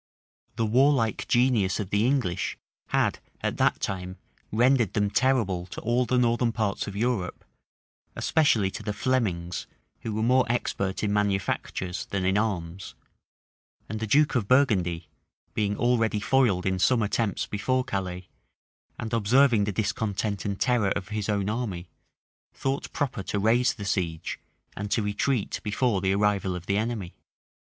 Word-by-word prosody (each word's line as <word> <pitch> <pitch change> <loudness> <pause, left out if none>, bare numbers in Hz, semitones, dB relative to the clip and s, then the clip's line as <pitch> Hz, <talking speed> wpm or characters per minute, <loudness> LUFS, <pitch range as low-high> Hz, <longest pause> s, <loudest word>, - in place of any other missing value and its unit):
The 115 0 0
warlike 120 -1 +2
genius 120 -7 +2
of 100 -3 -4
the 105 +3 +2
English 125 -11 0 0.3
had - - +1 0.2
at - - -2
that - - +2
time 95 -1 -4 0.3
rendered 120 -1 +3
them 105 -1 +1
terrible 115 -9 +1
to - - -8
all 120 +2 +1
the 125 - +2
northern 120 -1 +2
parts 110 -3 -1
of 100 - -6
Europe; 110 -4 -2 0.7
especially 115 -12 +2
to - - -7
the 105 - -3
Flemings, 100 -7 -1 0.3
who 115 - -5
were 110 - 0
more 125 0 +3
expert 100 -5 -2
in 105 -1 +1
manufactures 95 -2 -1
than 95 -2 -2
in 95 +1 +2
arms; 95 -4 -2 0.9
and 110 +1 -4
the 110 - -3
duke 150 +7 +4
of 120 -7 0
Burgundy, 95 - +2 0.5
being 105 -1 0
already 115 -3 +2
foiled 110 -6 +2
in 95 -1 0
some 115 +4 +3
attempts 105 -1 0
before 130 +5 0
Calais, 90 -4 -4 0.7
and 115 +1 -5
observing 115 0 +4
the 105 - -1
discontent 100 -1 -2
and 100 -1 -2
terror 120 -6 +2
of 95 0 -3
his 105 -1 -3
own 100 -2 0
army, 105 -6 -3 0.6
thought 135 +1 -2
proper 135 -8 -2
to 100 - -3
raise 120 +5 +3
the 100 - -7
siege, 85 -5 -2 0.4
and 105 +1 -4
to 110 - +1
retreat 105 +3 -1
before 105 -1 0
the 95 0 +1
arrival 100 -2 +1
of 90 -1 -7
the 100 +2 +1
enemy. 110 -5 -2
105 Hz, 155 wpm, -26 LUFS, 95-120 Hz, 0.9 s, duke